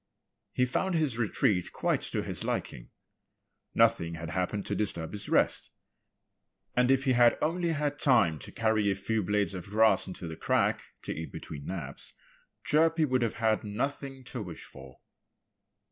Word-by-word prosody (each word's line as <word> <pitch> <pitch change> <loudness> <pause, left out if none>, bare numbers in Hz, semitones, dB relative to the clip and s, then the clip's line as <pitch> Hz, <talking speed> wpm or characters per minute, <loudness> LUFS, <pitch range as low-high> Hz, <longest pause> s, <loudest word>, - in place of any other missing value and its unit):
He 125 - +2
found 175 +8 -1
his 145 -8 0
retreat 100 -4 +1
quite - - 0
to - - -1
his - - -1
liking. - - -3 0.9
Nothing 85 0 +3
had 85 -1 -6
happened 95 +3 -2
to - - -2
disturb 85 -6 -1
his 105 0 -5
rest. - - +2 1.1
And 125 0 +3
if 135 0 +4
he 130 - +3
had 120 -1 +5
only 170 +2 0
had 145 -1 -2
time 100 - +3
to - - -10
carry 110 -2 +1
a 95 - +1
few 110 +3 -1
blades 105 +1 +1
of 95 +1 -7
grass 110 0 +4
into 90 -2 -7
the 80 - -6
crack, - - +1 0.2
to - - -3
eat 80 - -6
between 70 -2 -8
naps, 75 -8 -7 0.5
Chirpy 160 +1 +3
would 130 -3 +1
have 115 -2 0
had 110 -1 +1
nothing 135 +5 -4
to 125 -1 -6
wish 90 -5 -7
for. 65 -1 -13
110 Hz, 165 wpm, -29 LUFS, 90-130 Hz, 1.1 s, had